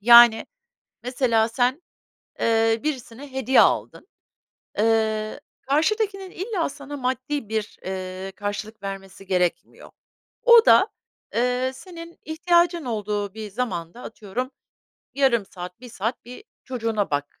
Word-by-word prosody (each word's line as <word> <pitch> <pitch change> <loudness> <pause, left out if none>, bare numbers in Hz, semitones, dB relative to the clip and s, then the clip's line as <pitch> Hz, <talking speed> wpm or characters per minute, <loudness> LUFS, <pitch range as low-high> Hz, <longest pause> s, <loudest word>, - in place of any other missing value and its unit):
Yani, 235 0 +8 0.6
mesela, 235 -3 +2
sen, 250 +6 0 0.6
ııı, 225 +1 +2
birisine 270 -2 -5
hediye 265 0 +4
aldın, - - +1 0.7
ııı, 220 +1 +1 0.2
karşıdakinin 390 +6 0
illa 380 -2 -2
sana 285 0 -8
maddi 260 -1 -2
bir, 220 -1 -3
ııı, 185 0 -5
karşılık 205 +1 -5
vermesi 195 0 -7
gerekmiyor. 180 -2 -1 0.5
O 470 -2 +8
da, - - +7 0.5
eee, 250 +2 +1
senin 335 +1 -11
ihtiyacın 340 0 +2
olduğu 210 -3 -2
bir 215 -1 -6
zamanda, 195 -2 -4
atıyorum, 225 +5 -5 0.6
yarım 265 -6 +3
saat, 180 +3 -9
1 250 - -10
saat 225 +2 -4
bir 250 - -11 0.2
çocuğuna 225 -5 -2
bak 145 0 -3
235 Hz, 115 wpm, -24 LUFS, 210-280 Hz, 0.7 s, Yani